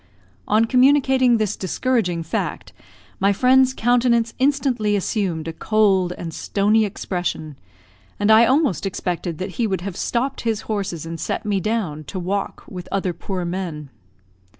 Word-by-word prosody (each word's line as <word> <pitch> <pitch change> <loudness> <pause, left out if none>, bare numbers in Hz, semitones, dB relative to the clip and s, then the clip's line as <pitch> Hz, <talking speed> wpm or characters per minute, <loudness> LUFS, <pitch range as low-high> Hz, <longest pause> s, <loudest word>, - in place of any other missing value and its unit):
On 215 +2 +3
communicating 260 -1 +4
this 215 -3 -1
discouraging 185 -3 -1
fact, 160 - -4 0.5
my 195 +1 +3
friend's 260 +5 +4
countenance 235 -1 +2
instantly 260 -6 +1
assumed 185 -5 -1
a 165 - -4
cold 195 -1 +2
and 165 -2 -6
stony 210 +5 +1
expression, 175 -6 -4 0.6
and 205 +1 +3
I 225 +2 +7
almost 260 - +1
expected 175 -3 -3
that 185 +1 -4
he 235 - +1
would 190 -3 -2
have 190 -1 -5
stopped 255 +3 -2
his 225 -3 -1
horses 195 -7 -3
and 165 0 -6
set - - -3
me 205 -2 0
down, 190 -7 -2
to 190 - -7
walk 195 +2 -3
with 180 -1 -8
other 190 -2 -1
poor 180 +1 -4
men. 170 -5 -5
205 Hz, 150 wpm, -21 LUFS, 180-235 Hz, 0.6 s, I